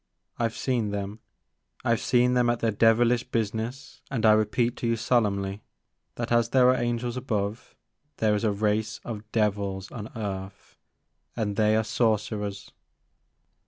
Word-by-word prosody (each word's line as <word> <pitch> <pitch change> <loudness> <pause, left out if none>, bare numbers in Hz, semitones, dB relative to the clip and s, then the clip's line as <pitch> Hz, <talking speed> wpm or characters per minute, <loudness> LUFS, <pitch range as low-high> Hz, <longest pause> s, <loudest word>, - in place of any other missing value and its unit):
I 115 - +2
've 110 - -14
seen 120 -5 0
them, 100 +1 -4 0.3
— - - -33
I 115 - +4
've - - -5
seen 125 0 +3
them 125 -1 +3
at 120 -1 +1
their 115 - +1
devilish 115 +3 +3
business, 115 +5 -3
and 115 -5 -1
I 110 - +8
repeat 110 +3 +2
to 120 - -2
you 115 - +2
sol 120 +1 +2
emnly, 100 -1 -2 0.6
that 120 -1 -4
as 120 -1 +3
there 125 -1 +5
are 130 - +5
angels 120 0 -2
above, 110 -4 -3 0.4
there 110 -1 +2
is 105 - -1
a 110 - +2
race 105 +2 0
of 110 -2 -7
devils 100 -3 -1
on 110 -2 -7
earth, 95 -3 -6 0.6
and 105 -3 -2
they 110 0 +3
are 110 - +2
sorcerers. 105 -2 -1
110 Hz, 165 wpm, -26 LUFS, 105-120 Hz, 0.6 s, I